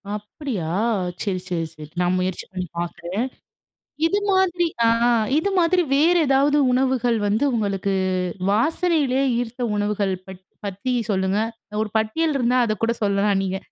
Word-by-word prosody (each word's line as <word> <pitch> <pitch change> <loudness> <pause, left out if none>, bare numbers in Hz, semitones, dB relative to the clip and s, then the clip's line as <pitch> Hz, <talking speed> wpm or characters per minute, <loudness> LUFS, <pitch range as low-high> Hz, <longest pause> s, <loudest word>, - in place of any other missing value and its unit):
அப்பிடியா! 210 - -5 0.6
சரி 190 -3 -1
சரி 170 -3 -1
சரி. 150 -1 -10
நான் 180 +1 +2
முயற்சி 185 -1 -2
பண்ணி 185 -1 -4
பாக்குறேன். 175 +5 -3 0.8
இது 400 +5 +1
மாதிரி 360 -2 +2 0.2
ஆ, - - +5 0.5
இது 360 +6 +1
மாதிரி 355 +1 +3
வேறு 340 +5 +4
ஏதாவது 275 +2 +3
உணவுகள் 250 -2 +2
வந்து, 210 +6 +1
உங்களுக்கு 200 -3 -1 0.6
வாசனையிலே 290 - +2 0.2
ஈர்த்த 245 +1 -5
உணவுகள் 205 -1 0
பற் 190 -1 -10 0.2
பத்தி 200 +6 -3 0.2
சொல்லுங்க. 190 +1 0 0.4
ஒரு 220 - -2
பட்டியல் 295 +9 0
இருந்தா 245 0 +2
அதக்கூட 225 +1 0
சொல்லலாம் 200 0 +2
நீங்க. 190 0 -2
220 Hz, 130 wpm, -22 LUFS, 195-275 Hz, 0.8 s, ஆ